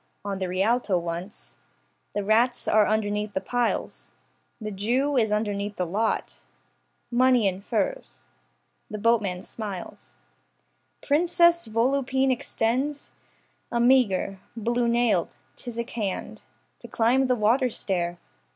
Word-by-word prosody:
On 200 -1 -3
the 185 -1 -2
Rialto 195 +2 +1
once. 175 +4 -6 0.6
The 205 - 0
rats 230 +4 +2
are 215 -1 +4
underneath 210 -1 -1
the - - +2
piles. 245 +4 -2 0.5
The 215 -2 -5
jew 245 +9 0
is 220 -4 +2
underneath 205 -1 -1
the 180 - -1
lot. 205 - -2 0.7
Money 250 -2 +4
in 190 0 -2
furs. 210 -1 -3 0.7
The 215 - -5
boatman 210 -5 +1
smiles, 190 - -8 0.9
Princess 340 +1 +3
Volupine 265 +3 +1
extends 255 +4 -1 0.6
A 235 - 0
meagre, 235 -6 +3 0.2
blue 235 +2 0
nailed, 235 -7 +1 0.2
phthisic 235 0 -6
hand 195 - -4 0.4
To - - -10
climb 250 +4 +2
the 250 - +2
waterstair. 210 -7 0
225 Hz, 115 wpm, -26 LUFS, 200-245 Hz, 0.9 s, are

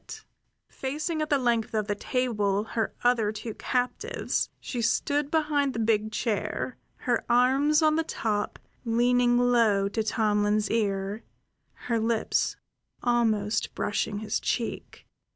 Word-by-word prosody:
Then, - - -9 0.5
facing 305 +4 -3
at 305 - -2
the 290 - +4
length 235 -4 0
of 215 -1 +1
the 205 - -1
table 210 -3 0
her 225 0 -2
other 235 -4 +3
two 215 +1 -6
captives, 430 - -1
she 245 - -4
stood 285 +5 +1
behind 295 -3 +1
the 230 - -3
big 215 -1 +1
chair, 210 +2 -2 0.3
her 240 -2 +1
arms 270 +6 +4
on 310 0 +4
the 325 - +2
top, 210 -8 -2 0.3
leaning 240 +1 +3
low 230 -5 +3
to 220 +2 -1
Tomlin's 210 -1 +1
ear, 200 -1 -1 0.6
her 230 -2 +1
lips 225 0 0 0.5
almost 225 -3 +1
brushing 205 0 -1
his 210 0 -2
cheek. 235 - -3
230 Hz, 135 wpm, -27 LUFS, 210-255 Hz, 0.6 s, the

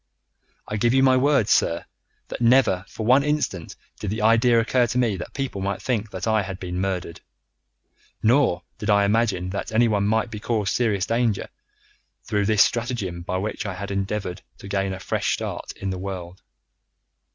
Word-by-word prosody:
"I 105 - -3
give 120 +4 +2
you 135 - +4
my 130 -1 +5
word, 135 -4 +3
sir, 85 -5 +2 0.4
that - - -6
never 115 -6 +4
for 110 - -6
one 130 +4 +5
instant 145 - -2 0.2
did 105 - -4
the 105 +1 -2
idea 115 +2 +5
occur 120 +1 +2
to 120 - -2
me 120 -5 +2
that 85 - -8
people 135 -8 -3
might 100 +1 -2
think 110 -4 -2
that 95 -2 -5
I 110 -1 +3
had 95 -1 -6
been 90 0 -4
murdered, 90 -3 -3 1.0
nor 115 -7 +3 0.2
did 105 - -3
I 100 -1 +4
imagine 100 -4 +1
that 100 - -4
anyone 110 -3 +2
might 110 +2 +1
be 105 - -6
caused 105 -3 -1
serious 105 -6 +1
danger 115 -3 0 0.7
through 105 -3 0
this 110 -2 +6
stratagem 115 -8 -2
by 90 +2 -3
which 105 +3 -3
I 95 -2 -5
endeavoured 100 -1 -3 0.2
to - - -11
gain 95 -1 -1
a 95 - -5
fresh - - -1
start - - -5
in 100 -1 -4
the 95 - -4
world. 95 -2 -6
105 Hz, 180 wpm, -23 LUFS, 95-120 Hz, 1.0 s, this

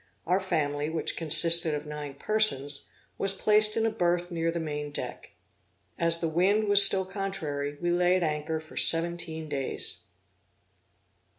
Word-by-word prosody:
Our 185 +2 +1
family, 150 -5 -2
which 160 0 -1
consisted 165 0 +2
of 150 +1 -6
nine 150 -2 -7
persons, 145 -8 -1 0.3
was 195 0 -1
placed 215 +2 +3
in 225 - +1
a 225 - 0
berth 175 -3 -1
near 165 -1 -2
the 170 - -4
main 150 -2 -5
deck. 145 - -7 0.7
As 165 0 +3
the 165 - -1
wind 185 +7 +1
was 205 0 +7
still 195 -1 +8
contrary, 160 -8 -4
we 175 0 -1
lay 180 +1 +2
at 185 - 0
anchor 155 0 -3
for 155 0 -15
seventeen 165 -1 +1
days. 140 -3 -4
165 Hz, 155 wpm, -27 LUFS, 150-190 Hz, 0.7 s, still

